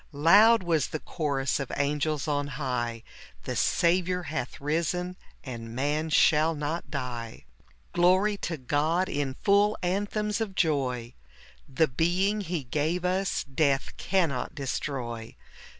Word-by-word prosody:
Loud 200 +9 +6
was 160 -5 +1
the 155 - -4
chorus 140 -5 -1
of 135 - -4
angels 150 +1 0
on 145 -1 0
high, 120 -5 -2 0.2
— - - -22
"The - - -4
Saviour 180 +1 +2
hath 145 -5 -4
risen, 170 +5 -1 0.3
and 115 -3 -7
man 150 +4 0
shall 155 +1 +4
not 150 +1 -3
die." 120 - -5 0.5
Glory 185 +4 +4
to 170 -4 -4
God, 155 +7 0
in 145 -6 -2
full 205 +1 +4
anthems 205 +4 -1
of 200 -4 -3
joy! 130 -8 0 0.6
The 145 +4 +2
being 180 +9 +1
He 175 -5 -3
gave 155 +8 -1
us 185 +1 0
death 140 -1 0
cannot 165 -8 0
destroy. 125 -5 -4
155 Hz, 130 wpm, -27 LUFS, 135-180 Hz, 0.6 s, Loud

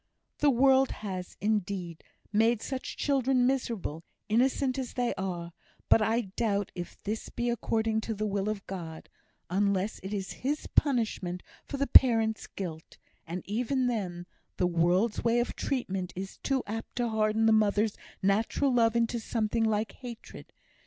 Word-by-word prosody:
"The 295 - +5
world 265 +1 +5 0.2
has, 185 -2 -5
indeed, 195 -5 -2 0.3
made 225 +1 +3
such 265 -1 -4
children 265 -3 +2
miserable, 230 - -1 0.3
innocent 255 +3 +2
as 255 -2 -4
they 245 -1 +1
are; 175 -3 -4 0.4
but 225 - +6
I 225 +2 +2
doubt 200 -1 -1
if 175 -1 -7
this 215 +2 -3
be 240 0 -1
according 220 -1 0
to 225 0 -3
the 215 +1 -2
will 200 0 -1
of 210 -2 -4
God, 165 -4 -7 0.4
unless 200 +1 +1
it 190 - -7
be 205 -1 -1
His 280 +9 -3
punishment 220 - 0 0.2
for 280 - -4
the 280 - +1
parents' 225 -5 +5
guilt; 165 -5 -7 0.3
and 175 +2 -4
even 250 +5 0
then 185 -8 -2 0.3
the 180 - +2
world's 180 +5 +2
way 235 +1 +3
of 240 - -1
treatment 195 -9 -2
is 190 +1 -6
too 270 -2 0
apt 225 +2 -6
to 245 -1 0
harden 220 0 +2
the 225 - +6
mother's 215 0 +3 0.3
natural 225 +7 +2
love 230 -2 +3
into 235 0 +1
something 225 0 0
like 215 0 0
hatred. 240 -3 -10
220 Hz, 155 wpm, -29 LUFS, 195-240 Hz, 0.4 s, but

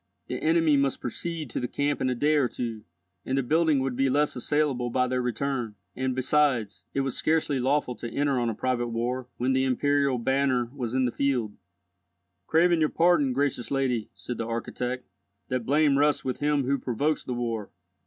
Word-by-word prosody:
The - - -5
enemy 160 -2 +3
must 140 -1 +1
proceed 155 +2 -4
to - - -2
the 125 - -2
camp 145 +3 -1
in 130 - +1
a 125 - 0
day 145 +5 +2
or 145 -4 +3
two, 115 -3 -5 0.4
and 130 - -1
the 135 - +1
building 155 +3 +3
would 130 -1 -2
be 135 +1 +2
less 145 +3 +1
assailable 130 -2 0
by 125 +1 +1
their 125 0 0
return; 125 -2 -2 0.2
and, 130 0 -1
besides, 130 -6 +1
it 135 - +2
was 135 -2 -2
scarcely 155 -3 +1
lawful 130 0 +1
to 120 - -5
enter 140 +1 0
on 120 -1 0
a 110 - -3
private 125 0 -1
war 120 +2 -2
when 130 +2 +1
the 130 0 +2
imperial 140 0 +2
banner 130 -1 +1
was 125 -3 -4
in 130 -1 +3
the 120 - 0
field. 125 -6 -1 0.9
"Craving 170 +1 +4
your 155 -1 +3
pardon, 165 -5 +3
gracious 135 -2 -1
lady," 130 -5 0
said 125 - -6
the 115 - -2
architect, 125 +2 -3 0.4
"that 125 -2 -2
blame 145 0 +3
rests 145 0 +2
with 130 -2 -2
him 145 -1 +1
who 140 +2 0
provokes 145 +6 -1
the 125 - -4
war. 115 -3 -3
130 Hz, 195 wpm, -27 LUFS, 125-145 Hz, 0.9 s, Craving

